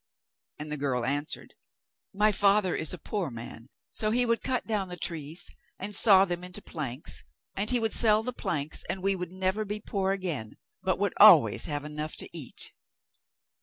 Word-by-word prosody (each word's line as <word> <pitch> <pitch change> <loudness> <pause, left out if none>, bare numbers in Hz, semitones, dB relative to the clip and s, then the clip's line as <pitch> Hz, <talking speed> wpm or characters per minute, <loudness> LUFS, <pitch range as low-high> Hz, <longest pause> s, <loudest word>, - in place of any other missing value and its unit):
And 150 0 -7
the 150 - -2
girl 130 -4 -1
answered: 145 +3 -3 0.6
'My 210 +2 +3
father 200 -1 +2
is 160 - -3
a 180 - -4
poor 185 +1 -3
man, 115 0 -9 0.2
so 215 - +1
he 245 +3 +2
would 230 -1 +1
cut 255 -2 -1
down 210 -4 -2
the 180 0 -7
trees, 160 -2 -4 0.3
and 205 +2 -5
saw 195 -2 +7
them 175 -1 -4
into 180 0 -7
planks, 135 -6 -4 0.3
and 200 +2 0
he 250 -1 +3
would 225 -1 0
sell 215 -1 +6
the 250 +2 -4
planks, 155 -8 -2
and 190 - -3
we 195 0 +3
should 180 -2 -5
never 190 +3 -1
be 210 0 -5
poor 195 -2 -2
again; 170 - -4 0.2
but - - 0
would - - 0
always - - +7
have 145 -1 -3
enough 150 +1 -5
to - - -4
eat. 150 -7 -4
185 Hz, 185 wpm, -28 LUFS, 150-210 Hz, 0.6 s, saw